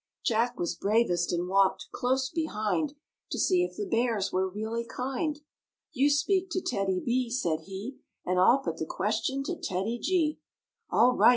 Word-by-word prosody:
Jack 235 Hz, +2 st, +1 dB
was 175 Hz, -, 0 dB
bravest 200 Hz, -5 st, +1 dB
and 175 Hz, +1 st, -1 dB
walked 195 Hz, 0 st, +2 dB
close 260 Hz, +1 st, 0 dB
behind 300 Hz, -1 st, -1 dB, 0.3 s
To -, -, -3 dB
see 365 Hz, -1 st, +3 dB
if 360 Hz, -, -4 dB
the 410 Hz, -, -2 dB
Bears 230 Hz, -, 0 dB
were 190 Hz, +1 st, +1 dB
really 220 Hz, +4 st, -3 dB
kind. 270 Hz, +6 st, -3 dB, 0.5 s
"You 280 Hz, +1 st, +3 dB
speak 370 Hz, +6 st, +2 dB
to 370 Hz, -, +1 dB
TEDDY 195 Hz, -, -1 dB
B," 250 Hz, 0 st, +1 dB
said 175 Hz, -10 st, 0 dB
he, 200 Hz, +7 st, -6 dB, 0.3 s
"And 180 Hz, 0 st, +1 dB
I'll 210 Hz, +8 st, +6 dB
put -, -, -3 dB
the -, -, -3 dB
question 275 Hz, +1 st, -1 dB
to 350 Hz, +5 st, -3 dB
TEDDY 205 Hz, -, -2 dB
G." 330 Hz, -3 st, +1 dB, 0.5 s
"All 250 Hz, +2 st, +5 dB
right!" -, -, +7 dB
240 Hz, 170 wpm, -29 LUFS, 195-285 Hz, 0.5 s, right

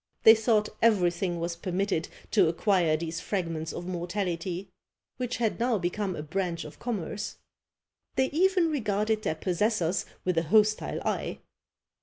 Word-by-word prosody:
They 220 Hz, -, +10 dB
thought 220 Hz, -1 st, +2 dB
everything 180 Hz, -5 st, +2 dB
was 170 Hz, 0 st, -2 dB
permitted 185 Hz, 0 st, -1 dB, 0.2 s
to 195 Hz, -6 st, +5 dB
acquire 170 Hz, -2 st, +2 dB
these 165 Hz, 0 st, -4 dB
fragments 165 Hz, -5 st, -2 dB
of 175 Hz, -, -6 dB
mortality, 180 Hz, 0 st, -3 dB, 0.5 s
which 250 Hz, -1 st, -2 dB
had 230 Hz, -2 st, 0 dB
now 240 Hz, -1 st, +2 dB
become 185 Hz, +1 st, -2 dB
a 150 Hz, -, -5 dB
branch 170 Hz, +1 st, -2 dB
of 150 Hz, -, -11 dB
commerce. 210 Hz, -3 st, -4 dB, 0.8 s
They 265 Hz, 0 st, +2 dB
even 360 Hz, 0 st, +3 dB
regarded 215 Hz, -4 st, 0 dB
their 160 Hz, -, -1 dB
possessors 180 Hz, +1 st, 0 dB, 0.2 s
with 180 Hz, -2 st, +2 dB
an 165 Hz, -, -3 dB
hostile 215 Hz, +4 st, +2 dB
eye. -, -, -2 dB
190 Hz, 140 wpm, -28 LUFS, 170-215 Hz, 0.8 s, They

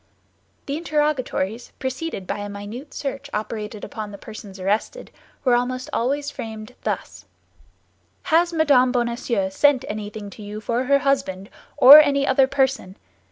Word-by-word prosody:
The 285 Hz, +1 st, -3 dB
interrogatories, 295 Hz, -, -1 dB
preceded 260 Hz, -, -4 dB
by 205 Hz, -, -4 dB
a 205 Hz, 0 st, -5 dB
minute 205 Hz, +8 st, -8 dB
search 280 Hz, 0 st, -5 dB
operated 210 Hz, 0 st, -5 dB
upon 210 Hz, 0 st, -6 dB
the 200 Hz, -, -9 dB
persons 200 Hz, -2 st, -10 dB
arrested, 210 Hz, -, -2 dB, 0.3 s
were 255 Hz, -3 st, +3 dB
almost 255 Hz, +3 st, -1 dB
always 280 Hz, +4 st, -1 dB
framed 220 Hz, +1 st, -8 dB
thus: -, -, -4 dB, 1.0 s
"Has 340 Hz, +2 st, +3 dB
Madame 285 Hz, -6 st, +4 dB
Bonacieux 235 Hz, -5 st, -1 dB
sent 275 Hz, +5 st, +3 dB
anything 210 Hz, -1 st, -6 dB
to 215 Hz, -, -12 dB
you 210 Hz, +1 st, -7 dB
for 235 Hz, +4 st, -1 dB
her 280 Hz, +2 st, +4 dB
husband, 255 Hz, -9 st, -1 dB, 0.3 s
or 280 Hz, +4 st, +11 dB
any 280 Hz, -2 st, +3 dB
other 265 Hz, 0 st, +4 dB
person? 265 Hz, -8 st, -1 dB
250 Hz, 140 wpm, -22 LUFS, 210-280 Hz, 1.0 s, or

